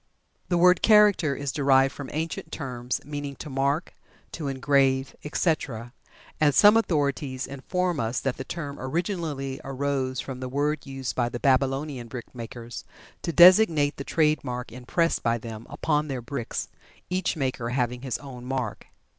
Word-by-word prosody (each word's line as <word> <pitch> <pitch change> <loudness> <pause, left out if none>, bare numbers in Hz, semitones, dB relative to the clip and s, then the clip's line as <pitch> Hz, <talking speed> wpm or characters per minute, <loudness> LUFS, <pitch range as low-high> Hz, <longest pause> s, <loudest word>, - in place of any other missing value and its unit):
The 175 - +2
word 180 +1 +5
"Character" 210 -9 +5
is 140 -2 -3
derived 135 -1 +3
from 140 -2 -7
ancient 160 +2 -4
terms 125 -2 -4
meaning 145 -1 -5
"to 150 - -8
mark," 140 +5 0 0.4
"to 155 -4 -5
engrave," 135 -1 +2
etc., 135 -7 -1 0.5
and 145 -3 +3
some 210 +1 +8
authorities 140 - 0
inform 175 +5 -2
us 115 +2 -1
that 135 -2 -2
the 130 - -4
term 145 -2 -6
originally 145 -3 -3
arose 135 -1 -2
from 130 -2 -5
the 130 0 -5
word 145 +2 -1
used 135 -2 -4
by 120 -1 +1
the 120 - -5
Babylonian 135 -1 +1
brickmakers 120 -1 -8 0.4
to 170 - -2
designate 170 -5 +6
the 140 - -4
trade 155 0 +2
mark 125 -2 -5
impressed 130 +8 0
by 115 0 +1
them 115 -1 -8
upon 150 +1 0
their 130 -4 -4
bricks, 130 -3 -4 0.4
each 185 -1 0
maker 130 -4 -2
having 125 -1 -1
his 130 -2 -2
own 130 -4 -10
mark. 130 -3 -4
140 Hz, 155 wpm, -26 LUFS, 130-155 Hz, 0.5 s, some